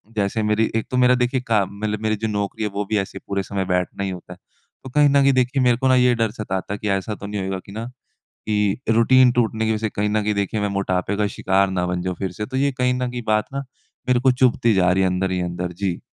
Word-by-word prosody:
जैसे 105 Hz, +2 st, 0 dB
मेरी 105 Hz, +1 st, +1 dB
एक 115 Hz, -, -1 dB
तो 125 Hz, -, 0 dB
मेरा 125 Hz, 0 st, +5 dB
देखिए 125 Hz, +1 st, 0 dB
का 105 Hz, -3 st, +3 dB
मतलब 105 Hz, +2 st, -4 dB
मेरी 110 Hz, 0 st, 0 dB
जो -, -, +1 dB
नौकरी 105 Hz, +1 st, -3 dB
है 105 Hz, -, 0 dB
वो 100 Hz, 0 st, -2 dB
भी 110 Hz, -, +1 dB
ऐसे 95 Hz, 0 st, -5 dB
पूरे 100 Hz, -1 st, -1 dB
समय 95 Hz, 0 st, -3 dB
बैठना 90 Hz, +2 st, -1 dB
ही 95 Hz, -, -2 dB
होता 90 Hz, -1 st, -8 dB
है। -, -, -17 dB, 0.5 s
तो 130 Hz, -, -8 dB
कहीं 145 Hz, +2 st, +4 dB
न 140 Hz, 0 st, +4 dB
कहीं 135 Hz, 0 st, +4 dB
देखिए 130 Hz, +1 st, +1 dB
मेरे 120 Hz, -2 st, +3 dB
को 130 Hz, -, 0 dB
ना 130 Hz, -, +5 dB
ये 125 Hz, -1 st, +4 dB
डर 115 Hz, -2 st, 0 dB
सताता 100 Hz, -3 st, -4 dB
है -, -, -3 dB
कि 105 Hz, -, -3 dB
ऐसा 105 Hz, +2 st, -4 dB
तो 100 Hz, -, -9 dB
नहीं 105 Hz, -1 st, -3 dB
होगा 95 Hz, -1 st, -3 dB
कि 100 Hz, -, -12 dB
ना 110 Hz, +3 st, -5 dB, 0.6 s
कि 105 Hz, 0 st, +1 dB
रूटीन 125 Hz, +2 st, +5 dB
टूटने 110 Hz, -2 st, 0 dB
की 110 Hz, -, +1 dB
वज़ह 105 Hz, -, -2 dB
से -, -, -5 dB
कहीं 105 Hz, +1 st, -1 dB
न 105 Hz, 0 st, 0 dB
कहीं 105 Hz, 0 st, 0 dB
देखिए 100 Hz, +2 st, -1 dB
मैं 105 Hz, -, 0 dB
मोटापे 95 Hz, +1 st, -1 dB
का 105 Hz, -1 st, +1 dB
शिकार 95 Hz, +1 st, +2 dB
न 90 Hz, -1 st, -1 dB
बन 90 Hz, 0 st, -2 dB
जाऊँ 90 Hz, 0 st, -3 dB
फ़िर 95 Hz, -2 st, -2 dB
से, 105 Hz, -, -5 dB
तो 130 Hz, +2 st, -4 dB
ये 140 Hz, +1 st, +2 dB
कहीं 125 Hz, -1 st, 0 dB
न 125 Hz, 0 st, -2 dB
कहीं 120 Hz, -1 st, -5 dB
बात 105 Hz, 0 st, +2 dB
ना 140 Hz, 0 st, -3 dB, 0.5 s
मेरे 125 Hz, -, +4 dB
को 130 Hz, +1 st, +4 dB
चुभती 125 Hz, -3 st, +2 dB
जा 90 Hz, -2 st, +3 dB
रही 95 Hz, +1 st, +2 dB
है 95 Hz, -, +2 dB
अंदर 95 Hz, +1 st, -1 dB
ही 90 Hz, -, -1 dB
अंदर। 90 Hz, 0 st, -3 dB
जी। 90 Hz, -1 st, -2 dB
105 Hz, 285 wpm, -21 LUFS, 95-125 Hz, 0.6 s, मेरा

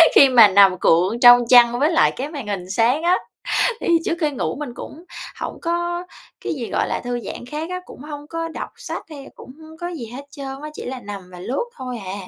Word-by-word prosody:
khi 275 Hz, -, +8 dB
mà 240 Hz, -4 st, +8 dB
nằm 195 Hz, -1 st, +5 dB
cuộn 180 Hz, +9 st, +2 dB
trong 245 Hz, -1 st, +7 dB
chăn 240 Hz, -1 st, +6 dB
với 300 Hz, +4 st, +2 dB
lại 330 Hz, -, +4 dB
cái 275 Hz, +3 st, -4 dB
màn 285 Hz, -8 st, -7 dB
hình 190 Hz, -3 st, -4 dB
sáng 235 Hz, -, +1 dB
á. 355 Hz, +2 st, +3 dB, 0.6 s
Thì -, -, -3 dB, 0.2 s
trước 335 Hz, -, -1 dB
khi 300 Hz, -2 st, +1 dB
ngủ 265 Hz, -, -3 dB
mình 280 Hz, -5 st, -6 dB
cũng 325 Hz, -, -10 dB, 0.4 s
hổng -, -, -5 dB
có 345 Hz, +1 st, -2 dB, 0.4 s
cái -, -, -2 dB
gì 250 Hz, -7 st, -5 dB
gọi -, -, 0 dB
là -, -, -3 dB
thư 245 Hz, 0 st, -3 dB
giãn 240 Hz, -, -8 dB
khác 300 Hz, +6 st, -5 dB
á, 365 Hz, 0 st, -4 dB
cũng -, -, -13 dB
hông 295 Hz, 0 st, -8 dB
có 330 Hz, 0 st, -3 dB
đọc 325 Hz, -, -6 dB
sách -, -, -6 dB
hay 280 Hz, -3 st, -10 dB
cũng -, -, -12 dB
hông 315 Hz, 0 st, -13 dB
có 345 Hz, +1 st, -5 dB
gì 320 Hz, -10 st, -6 dB
hết 280 Hz, +2 st, -8 dB
trơn 275 Hz, -1 st, -7 dB
á, 305 Hz, -, -5 dB
chỉ -, -, -8 dB
là 255 Hz, 0 st, -5 dB
nằm 200 Hz, -4 st, -9 dB
và 180 Hz, -, -11 dB
lướt 255 Hz, -, -3 dB
thôi 250 Hz, -2 st, -5 dB
à. 185 Hz, -, -5 dB
270 Hz, 240 wpm, -21 LUFS, 235-315 Hz, 0.6 s, khi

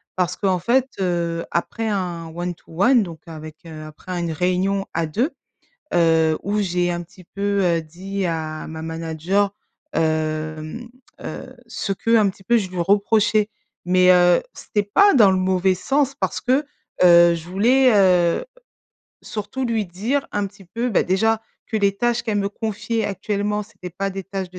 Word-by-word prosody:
Parce 180 Hz, -1 st, 0 dB
qu'en 190 Hz, -3 st, 0 dB
fait, 245 Hz, +8 st, +2 dB
heu, 170 Hz, -2 st, -1 dB
après 220 Hz, +6 st, -2 dB
un 175 Hz, -5 st, -3 dB
one 175 Hz, +1 st, -3 dB
to -, -, -30 dB, 0.2 s
one 245 Hz, -1 st, +5 dB
donc 165 Hz, -4 st, -8 dB
avec, 155 Hz, -1 st, -9 dB
heu, 155 Hz, -2 st, -9 dB
après 175 Hz, +4 st, -7 dB
une 170 Hz, -1 st, -2 dB
réunion 185 Hz, +4 st, 0 dB
à 165 Hz, 0 st, 0 dB
2, 235 Hz, -, 0 dB, 0.7 s
heu, 160 Hz, -2 st, +3 dB
où 205 Hz, +2 st, -1 dB
j'ai 180 Hz, -2 st, 0 dB
un 175 Hz, 0 st, -3 dB
petit 180 Hz, +2 st, -17 dB
peu, 200 Hz, +2 st, -1 dB
heu, 170 Hz, -2 st, +2 dB
dit 190 Hz, +5 st, -4 dB
à 160 Hz, -2 st, -4 dB
ma 160 Hz, 0 st, -7 dB
manager, 165 Hz, +5 st, -1 dB, 0.4 s
hem, 155 Hz, +5 st, -2 dB, 0.3 s
heu, -, -, -8 dB
ce 200 Hz, -, -3 dB
qu'un 225 Hz, 0 st, +3 dB
petit 190 Hz, -, -18 dB
peu 235 Hz, +5 st, +3 dB
je 195 Hz, -4 st, -3 dB
lui 185 Hz, -, -6 dB
reprochais. 205 Hz, +3 st, +2 dB, 0.4 s
Mais, 185 Hz, 0 st, +5 dB
heu, 175 Hz, -1 st, +5 dB
c'était 205 Hz, -, -2 dB
pas 395 Hz, -, +4 dB
dans 215 Hz, -7 st, +7 dB
le 190 Hz, -, +2 dB
mauvais 185 Hz, 0 st, +2 dB
sens 275 Hz, +8 st, 0 dB
parce 285 Hz, -, -2 dB
que, 265 Hz, +4 st, +2 dB, 0.4 s
heu, 170 Hz, -1 st, +7 dB
je 165 Hz, -1 st, -6 dB
voulais, 250 Hz, +8 st, +4 dB
heu, 180 Hz, -, +3 dB, 0.8 s
surtout 215 Hz, +5 st, -4 dB
lui 225 Hz, -2 st, 0 dB
dire 220 Hz, +11 st, -2 dB
un 205 Hz, -1 st, 0 dB
petit 195 Hz, 0 st, -14 dB
peu 230 Hz, +7 st, -3 dB
bah 210 Hz, -, +3 dB
déjà, 220 Hz, +4 st, +1 dB, 0.2 s
que 220 Hz, -, -2 dB
les 200 Hz, -2 st, +1 dB
tâches 240 Hz, +2 st, 0 dB
qu'elle 215 Hz, -3 st, -1 dB
me 200 Hz, 0 st, 0 dB
confiait 220 Hz, +1 st, -3 dB
actuellement, 205 Hz, +1 st, -2 dB
c'était 200 Hz, -4 st, -10 dB
pas 195 Hz, +3 st, -3 dB
des 195 Hz, 0 st, -6 dB
tâches 190 Hz, -1 st, -5 dB
de 180 Hz, -, -10 dB
190 Hz, 175 wpm, -21 LUFS, 170-210 Hz, 0.8 s, dans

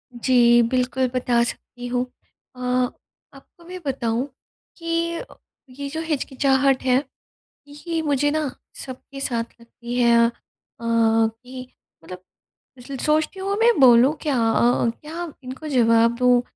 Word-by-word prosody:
जी, 240 Hz, -1 st, +4 dB
बिल्कुल 255 Hz, 0 st, 0 dB
बता 245 Hz, -2 st, +1 dB
सकती 245 Hz, 0 st, -6 dB
हूँ। 245 Hz, +1 st, -1 dB, 0.5 s
अ, -, -, -14 dB, 0.7 s
आपको 275 Hz, +5 st, -18 dB
मैं 365 Hz, +1 st, -8 dB
बताऊँ 250 Hz, -1 st, -1 dB, 0.5 s
कि 335 Hz, -, -13 dB, 0.9 s
ये 280 Hz, -, -4 dB
जो 320 Hz, +2 st, -4 dB
हिचकिचाहट 275 Hz, -3 st, +1 dB
है 260 Hz, +2 st, +2 dB, 0.6 s
ये 320 Hz, +3 st, -4 dB
मुझे 290 Hz, -1 st, +1 dB
ना 305 Hz, -2 st, -1 dB, 0.4 s
सबके 270 Hz, +1 st, -10 dB
साथ 235 Hz, -3 st, -1 dB, 0.2 s
लगती 235 Hz, +1 st, -8 dB
है। 235 Hz, -1 st, +5 dB
अ, -, -, -4 dB, 0.5 s
कि 230 Hz, +2 st, 0 dB, 0.4 s
मतलब 180 Hz, +2 st, -10 dB, 0.5 s
इसलिए 265 Hz, +2 st, -8 dB
सोचती 310 Hz, +5 st, +1 dB
हूँ 395 Hz, +1 st, -2 dB
मैं 475 Hz, +1 st, +5 dB
बोलूँ 250 Hz, +2 st, +6 dB
क्या? 290 Hz, -5 st, 0 dB
अ, 240 Hz, 0 st, +2 dB
क्या 325 Hz, +1 st, -7 dB
इनको 260 Hz, +5 st, -8 dB
जवाब 230 Hz, -3 st, +3 dB
दूँ 250 Hz, -1 st, +4 dB
255 Hz, 125 wpm, -22 LUFS, 240-290 Hz, 0.9 s, बोलूँ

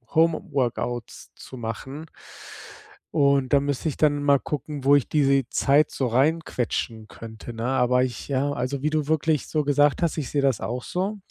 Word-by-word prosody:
Home 165 Hz, 0 st, +3 dB
Workouts 120 Hz, -3 st, -3 dB
zu 130 Hz, -, -11 dB
machen. 130 Hz, +7 st, -6 dB, 1.1 s
Und 140 Hz, -1 st, +2 dB
da 140 Hz, -, +6 dB
müsste 140 Hz, +2 st, -2 dB
ich 145 Hz, -, -6 dB
dann 145 Hz, -2 st, +2 dB
mal 140 Hz, -1 st, +4 dB
gucken, 145 Hz, 0 st, -5 dB
wo 140 Hz, +1 st, +6 dB
ich 140 Hz, -, +2 dB
diese 135 Hz, -4 st, +2 dB
Zeit 145 Hz, +2 st, +3 dB
so 130 Hz, -, -1 dB
rein 150 Hz, +8 st, +2 dB
quetschen 115 Hz, -2 st, -3 dB
könnte, 115 Hz, +2 st, -10 dB
ne, 115 Hz, 0 st, -4 dB
aber 125 Hz, -1 st, +2 dB
ich 125 Hz, -3 st, -4 dB
ja, 140 Hz, +1 st, 0 dB
also 135 Hz, 0 st, -3 dB
wie 150 Hz, -, +1 dB
du 155 Hz, -2 st, -1 dB
wirklich 155 Hz, -2 st, +1 dB
so 155 Hz, -1 st, 0 dB
gesagt 145 Hz, +2 st, +2 dB
hast, 170 Hz, -2 st, 0 dB
ich 145 Hz, -5 st, -3 dB
sehe 145 Hz, -, 0 dB
das 135 Hz, -5 st, +1 dB
auch 125 Hz, +1 st, -4 dB
so. 195 Hz, +4 st, -2 dB
140 Hz, 185 wpm, -24 LUFS, 125-150 Hz, 1.1 s, da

